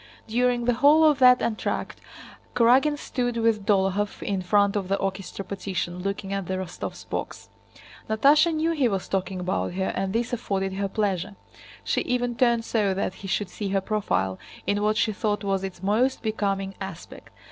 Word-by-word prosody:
During 240 +1 +1
the 245 - +3
whole 290 +6 +5
of 300 -3 +4
that 250 -1 +6
entr'acte 220 -2 -2 0.6
Kurágin 260 +6 +4
stood 245 -4 -2
with 225 -3 +1
Dólokhov 200 0 +1
in 195 -2 -1
front 200 +2 +2
of 195 -3 -1
the 195 - +1
orchestra 195 0 -4
partition, 180 -2 -4
looking 195 +1 -3
at 195 -3 -3
the 190 - -1
Rostóvs' 185 -2 -6
box. - - -5 0.6
Natásha 290 +9 +5
knew 320 +1 0
he 290 -6 +2
was 195 -4 -2
talking 190 -1 -2
about 180 -1 -1
her 190 +1 -1
and 190 0 -1
this 235 +3 -1
afforded 195 -5 -2
her 200 +1 -1
pleasure. 195 -1 -2 0.5
She - - 0
even 245 -1 -1
turned 235 -2 +2
so 205 -4 +1
that 190 -1 -1
he 195 - -6
should 195 +1 -1
see 205 -2 -4
her 195 0 +1
profile 190 - -1 0.3
in 205 0 0
what 215 +1 +1
she 220 -1 +1
thought 205 0 -1
was 195 -1 0
its 190 -1 -6
most 235 +7 +1
becoming 195 -3 -1
aspect. 190 -3 -8
205 Hz, 180 wpm, -25 LUFS, 195-240 Hz, 0.6 s, that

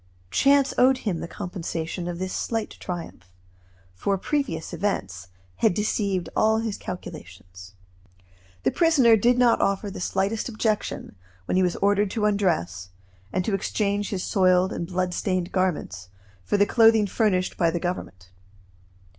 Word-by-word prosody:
Chance 275 - +3
owed 260 +1 +5
him 180 -6 -1
the - - -5
compensation 175 -2 -5
of 175 -1 -4
this 185 +1 -4
slight 225 -2 -2
triumph; 165 - -7 0.6
for 195 - -1
previous 190 - -2
events 95 - -3 0.3
had 175 - +2
deceived 200 -3 -1
all 220 0 +3
his 220 -2 -2
calculations. 90 - -9 0.9
The - - +2
prisoner 285 -9 +5
did 240 +3 +3
not 245 -2 +4
offer 200 +1 0
the 190 - -7
slightest 200 +6 -1
objection 215 -2 -2 0.3
when - - -1
he 185 - +4
was 180 -2 +1
ordered 205 0 +2
to 210 +1 -1
undress, 160 - 0 0.4
and 185 -1 -1
to 215 - -1
exchange 200 +1 -1
his 190 -3 -3
soiled 185 -1 +3
and 170 - -4
bloodstained 185 0 -1
garments 150 - -2 0.3
for 205 - 0
the 205 - +5
clothing 225 -1 +5
furnished 195 -3 0
by 170 - +2
the 170 +1 -2
Government. 95 - -5
190 Hz, 145 wpm, -25 LUFS, 170-215 Hz, 0.9 s, owed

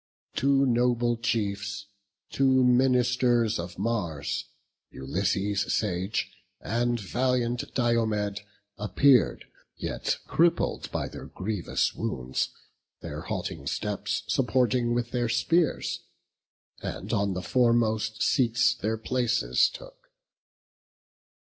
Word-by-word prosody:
Two 140 0 +3
noble 120 -1 +2
chiefs, 100 -3 -2 0.5
two 130 -1 +3
ministers 125 -3 +3
of 85 +1 -6
Mars, 95 -9 -2 0.4
Ulysses 100 +7 -1
sage, 95 -1 -1 0.3
and 120 +1 0
valiant 120 +3 -1
Diomed, 110 -4 +1 0.4
Appear'd, 125 +4 +3 0.3
yet - - -2
crippled 170 +1 +1
by - - -2
their - - -9
grievous 100 -1 -1
wounds, 65 +1 -2 0.5
Their - - -6
halting - - -4
steps - - -2
supporting 125 -1 +1
with 120 0 -2
their 120 -2 0
spears, 160 +7 +1 0.8
And - - -5
on 100 -2 +1
the 90 - -4
foremost 110 0 +2
seats 125 -1 +3
their 110 -2 -2
places 120 +1 +1
took. - - -13
120 Hz, 95 wpm, -27 LUFS, 105-125 Hz, 0.8 s, Two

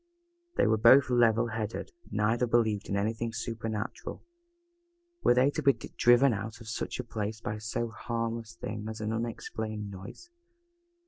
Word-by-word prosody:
They - - +3
were 110 -1 +3
both 130 +4 +7
level 120 -1 +4
headed, 110 0 -4 0.2
neither 115 +3 +1
believed 110 -3 +1
in 100 - 0
anything 110 +3 -1
super 115 0 -4
natural. 110 -1 -5 1.0
Were 120 - +4
they 130 +3 +4
to - - -2
be 140 0 +5
driven 120 +1 +3
out 110 +2 -5
of 115 - -12
such 115 - -3
a - - -1
place 110 -2 -4
by 105 -1 -4
so 115 +2 -2
harmless 115 0 -4
a - - -8
thing 105 0 -4
as 110 - -6
an 110 +1 -2
unexplained 110 -2 -4
noise? 100 - -10
115 Hz, 165 wpm, -30 LUFS, 110-120 Hz, 1.0 s, both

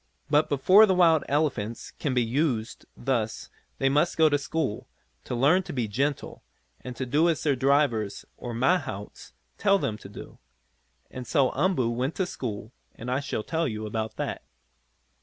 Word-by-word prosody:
But 150 +1 +3
before 185 +10 +6
the 190 - +2
wild 165 -4 +4
elephants 135 -7 -1
can 135 -4 -3
be 125 - +3
used 120 -2 -2
thus 115 -4 -2 0.3
they 135 - +1
must 150 +5 +2
go 160 -1 +5
to 145 - +2
school, 140 -5 -3 0.4
to - - -3
learn 145 +10 +4
to - - -8
be 120 -5 -1
gentle, 140 +7 -2 0.4
and 125 -1 -7
to 130 - -3
do 150 +7 +2
as 160 - -1
their 145 -3 +2
drivers, 130 -6 +1
or 120 - -7
mahouts, 130 - -2 0.3
tell 200 -1 +4
them 110 - -3
to - - -11
do. - - -11 0.7
And 125 -1 -7
so 140 -5 +2
Umboo 145 -7 +1
went 125 +6 -2
to 190 - 0
school 110 - -6 0.2
and 125 +2 -6
I 130 - +1
shall 140 -6 -3
tell 165 +4 -1
you 110 -3 -4
about 110 0 -4
that. - - -4
135 Hz, 175 wpm, -26 LUFS, 115-155 Hz, 0.7 s, before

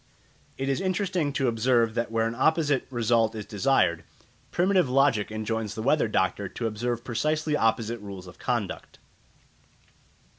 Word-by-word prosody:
It 135 - -3
is 135 +6 0
interesting 185 -4 0
to 135 -2 0
observe 115 0 +2
that 115 +1 -1
where 115 0 +1
an 115 - -1
opposite 145 +1 +1
result 115 -2 +1
is 105 -2 -5
desired, 100 -6 +1 0.5
primitive 185 -4 +2
logic 130 -6 +2
enjoins 110 0 -3
the 110 - -4
weather 140 0 +3
doctor 100 -1 0
to 115 - -5
observe 120 +2 -2
precisely 155 +5 0
opposite 115 -1 0
rules 100 -3 -9
of 90 - -13
conduct. - - -3
120 Hz, 145 wpm, -26 LUFS, 110-140 Hz, 0.5 s, weather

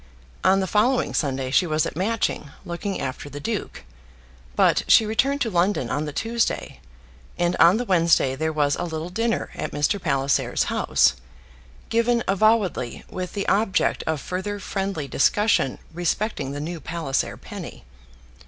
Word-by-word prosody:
On 190 +1 +4
the - - 0
following 240 +7 +2
Sunday 135 -3 -1
she 175 - +3
was 155 -1 +1
at - - -5
Matching, 195 -5 -1 0.2
looking 180 +3 -4
after 135 +1 -5
the 145 +1 -7
duke; 215 - -4 0.7
but - - +3
she 220 - +6
returned 275 +6 +1
to 225 - 0
London 175 - +1
on 150 - -1
the 150 - -4
Tuesday, 230 +8 -2 0.6
and 175 +1 +1
on 175 +5 +6
the 245 - -2
Wednesday 170 - +3
there 160 +3 -1
was 145 -2 +1
a - - -3
little 165 0 -4
dinner 230 +4 -1
at - - -4
Mr. 165 +7 0
Palliser's 140 -4 +1
house, - - +3 0.8
given 235 +1 +2
avowedly 195 - +1
with 185 -1 -5
the 200 -1 -3
object 205 0 +1
of 160 -2 0
further 190 +6 -4
friendly 195 -6 -3
discussion 205 - +2 0.2
respecting 175 -2 -1
the 145 - -5
new 165 +3 -5
Palliser 160 -5 -2
penny. - - -9
180 Hz, 155 wpm, -24 LUFS, 150-210 Hz, 0.8 s, she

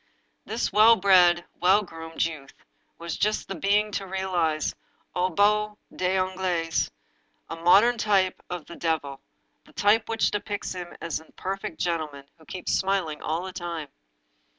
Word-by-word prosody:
This - - -2
well 220 +2 +7
bred, 180 -3 +5
well 190 +4 +4
groomed 165 -3 -3
youth 150 -5 -7 0.4
was 170 -1 -5
just 215 +1 0
the - - -4
being 205 +4 +1
to 195 -1 -3
realize 180 -5 -1 0.2
— - - -39
aux 180 +1 +1
bouts 210 +3 +2 0.2
des 185 +1 +1
ongles 185 -3 0 0.3
— - - -43
^a 165 0 -7
modern 225 +7 +5
type 195 -4 +2
of 180 -3 -5
the 170 - -10
devil, 150 -5 -2 0.4
the - - -21
type 215 +2 +3
which 225 -1 +1
depicts 205 0 -3
him 180 -1 -8
as 165 -2 -2
a 160 - -19
perfect 195 +1 -5
gentleman, 155 -5 -2
who 160 - -18
keeps 185 +2 -4
smiling 190 -5 0
all 160 +3 -2
the 190 0 -7
time. 170 -4 -5
185 Hz, 160 wpm, -26 LUFS, 165-200 Hz, 0.4 s, well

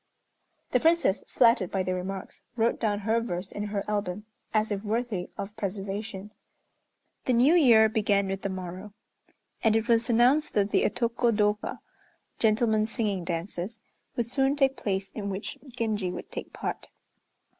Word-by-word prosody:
The 250 - +4
Princess, 320 - +3
flattered 230 -7 +4
by 190 -1 -1
the 185 - -1
remarks, 185 +1 -5
wrote 230 0 +1
down 210 -2 0
her 225 +3 +1
verse 185 -4 -4
in 205 - -4
her 205 -1 -2
album, 205 -1 -2 0.3
as 215 0 +1
if 200 -1 -1
worthy 220 -4 -2
of 205 +2 -6
preservation. 200 0 -4 0.9
The 255 - +2
New 250 +7 +5
Year 235 -10 +7
began 205 -2 +1
with 195 0 -3
the 195 - -2
morrow; 185 +2 -7 0.7
and 220 -2 +4
it 225 +1 +1
was 230 -1 +3
announced 250 +6 +3
that 205 -1 +2
the - - +3
Otoko 235 +1 +1
dôka 210 -1 0 0.6
(gentlemen's 220 -1 +2
singing 205 -6 -1
dances) 175 +5 -4 0.4
would 235 - 0
soon 270 +3 +1
take 270 -2 +3
place 195 -4 -2
in 200 -2 -4
which 195 +1 -5
Genji 220 -5 -1
would - - -8
take - - -6
part. - - -5
210 Hz, 155 wpm, -28 LUFS, 195-230 Hz, 0.9 s, Year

